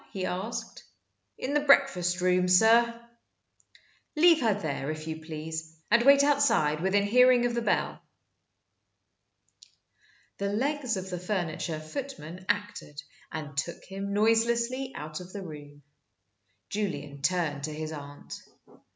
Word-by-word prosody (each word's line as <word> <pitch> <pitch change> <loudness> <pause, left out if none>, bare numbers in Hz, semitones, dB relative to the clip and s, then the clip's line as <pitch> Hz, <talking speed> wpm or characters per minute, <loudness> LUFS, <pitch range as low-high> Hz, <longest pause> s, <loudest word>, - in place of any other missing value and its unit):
he 190 -2 -3
asked. 190 +6 -5 0.5
"In 270 - -3
the 295 - +4
breakfast 190 -12 +3
room, 180 0 +3
sir." 230 +5 +5 1.2
"Leave 330 0 +6
her 220 -4 +2
there, 145 -5 -3
if 155 0 -5
you 160 0 -6
please, 160 0 -6
and 235 +1 +6
wait 280 +2 +6
outside 280 - +2
within 195 +2 +2
hearing 250 +3 +5
of 240 - 0
the 235 - -1
bell." - - -1 2.4
The 200 0 -1
legs 260 0 -1
of 190 0 -6
the 180 - -3
furniture 175 -4 -3
footman 185 - -7
acted, 205 -8 -3 0.3
and 150 -3 -6
took 160 +4 -3
him 195 +1 -5
noiselessly 235 +5 +1
out 155 +1 -6
of 180 0 -11
the 200 -2 -6
room. 145 -3 -11 0.9
Julian 150 -9 -4
turned 145 -2 0
to 155 - -5
his 155 +1 -5
aunt. 145 -2 -9
185 Hz, 130 wpm, -28 LUFS, 155-235 Hz, 2.4 s, Leave